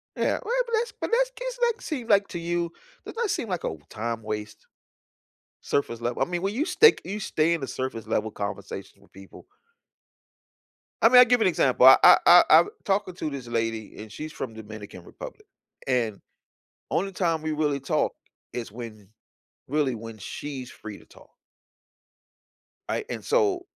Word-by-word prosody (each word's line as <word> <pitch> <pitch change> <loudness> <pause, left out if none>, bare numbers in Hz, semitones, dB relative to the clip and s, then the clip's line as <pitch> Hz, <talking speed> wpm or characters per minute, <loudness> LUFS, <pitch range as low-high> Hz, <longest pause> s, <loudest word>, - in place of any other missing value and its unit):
Yeah, - - 0
well, 470 - -3
but 470 - -8
that's 475 - -3
but - - -3
that's - - +3
case, - - -6
like 470 0 -3
seem 260 -8 -5
like 200 -2 +4
to 175 - -5
you 170 0 -2 0.3
does - - -9
that 460 -2 -1
seem 230 - -2
like 180 -3 -3
a - - -1
w 80 -2 -6
time 115 +1 -4
waste, 105 0 -6 1.0
surface-level 120 -3 -2
I - - +4
mean, 175 0 -3
when 195 +2 -1
you 275 +7 0
stake 385 +5 +5
you 200 +4 -5
stay 165 -4 +1
in 165 - -2
the 135 - -4
surface-level 115 -4 -3
conversations 100 -1 -7
with - - -24
people 95 0 -14 1.6
I 225 - +7
mean, 250 0 +8
I - - +11
give 245 -1 +3
an - - +4
example. 130 -7 +3
I 130 - +10
I 175 0 +8
I've 165 +2 +7 0.2
talking 195 -2 0
to 160 - -3
this 135 -4 -7
lady, 115 -2 -3
and 110 0 -11
she's 155 +8 -7
from 120 -7 -6
Dominican 105 -4 -10
Republic, - - -11 0.4
and 115 -6 0 0.7
only 195 +3 -1
time 170 -4 0
we 155 0 -2
really 150 -2 0
talk 135 - 0 0.4
is 120 -3 -5
when 110 -3 -10 0.6
really, 140 -2 0
when 115 0 -9
she's 130 +4 -7
free 105 -2 -10
to - - -19
talk. - - -19 1.6
I - - -1
and - - -5
so, 405 -6 +1
145 Hz, 175 wpm, -26 LUFS, -, 1.6 s, I